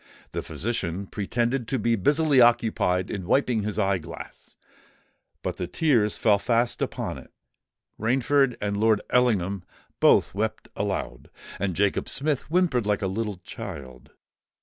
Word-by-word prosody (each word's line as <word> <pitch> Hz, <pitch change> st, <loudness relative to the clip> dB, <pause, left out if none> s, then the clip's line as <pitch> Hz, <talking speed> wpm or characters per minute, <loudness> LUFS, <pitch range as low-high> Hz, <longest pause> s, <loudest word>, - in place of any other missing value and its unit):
The -, -, -3 dB
physician 100 Hz, -4 st, -3 dB
pretended 120 Hz, +5 st, -1 dB
to 135 Hz, -, 0 dB
be 115 Hz, 0 st, +1 dB
busily 145 Hz, -, +3 dB
occupied 110 Hz, -6 st, +2 dB
in 95 Hz, -3 st, -5 dB
wiping 125 Hz, -2 st, +2 dB
his 105 Hz, -1 st, -3 dB
eye 100 Hz, -3 st, +2 dB
glass; 75 Hz, -, -11 dB, 0.9 s
but -, -, -3 dB
the -, -, -3 dB
tears 120 Hz, -10 st, +2 dB
fell 105 Hz, -2 st, +3 dB
fast 120 Hz, +2 st, 0 dB
upon -, -, -3 dB
it:—Rainford 130 Hz, +3 st, -2 dB
and 100 Hz, 0 st, -2 dB
Lord 110 Hz, 0 st, +3 dB
Ellingham 100 Hz, -7 st, +2 dB, 0.4 s
both -, -, +4 dB
wept 110 Hz, +3 st, -3 dB
aloud; -, -, -3 dB, 0.3 s
and 95 Hz, -3 st, -1 dB
Jacob 100 Hz, +2 st, +1 dB
Smith 145 Hz, 0 st, 0 dB
whimpered 160 Hz, -, +2 dB
like 105 Hz, 0 st, 0 dB
a -, -, +1 dB
little 105 Hz, +1 st, -3 dB
child. 65 Hz, -3 st, -9 dB
110 Hz, 135 wpm, -25 LUFS, 100-125 Hz, 0.9 s, both